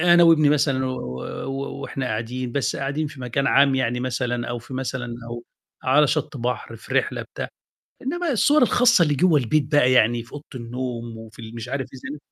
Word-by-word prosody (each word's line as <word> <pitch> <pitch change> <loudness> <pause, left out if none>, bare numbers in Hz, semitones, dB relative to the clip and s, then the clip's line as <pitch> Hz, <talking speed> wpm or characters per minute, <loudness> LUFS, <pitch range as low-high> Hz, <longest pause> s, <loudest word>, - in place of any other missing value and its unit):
أنا 175 0 +6
وابني 155 -3 +6
مثلًا 140 -3 +2
و - - -1 0.3
و - - -5 0.3
و 135 +1 -5
وإحنا 135 -2 -4
قاعدين 120 +3 -3
بس 135 -5 0
قاعدين 145 +3 -2
في 145 -2 -10
مكان 125 +2 -1
عام 140 -1 +5
يعني 125 -2 0
مثلًا 120 -1 -2
أو 120 0 -3
في 120 +3 -10
مثلًا 125 -2 -3
أو 120 0 -7 0.4
على 145 +2 +4
شَط 140 - -1
بَحر، 125 0 -3
في - - -8
رحلة - - +1
بتاع، - - -6 0.5
إنّما 340 +5 -1
الصور 285 +5 +4
الخاصة 245 -5 +5
اللي 150 -3 +1
جوّا 160 0 +4
البيت 140 +3 0
بقى 130 -3 +5
يعني 120 -1 +4
في 115 - -18
أوضة 145 - -7
النوم 120 -1 -5
وفي 110 0 -12
ال 110 +1 -9
مش 115 +1 -6
عارف 135 -2 -2
إيه 135 +3 -7
130 Hz, 200 wpm, -23 LUFS, 120-150 Hz, 0.5 s, أنا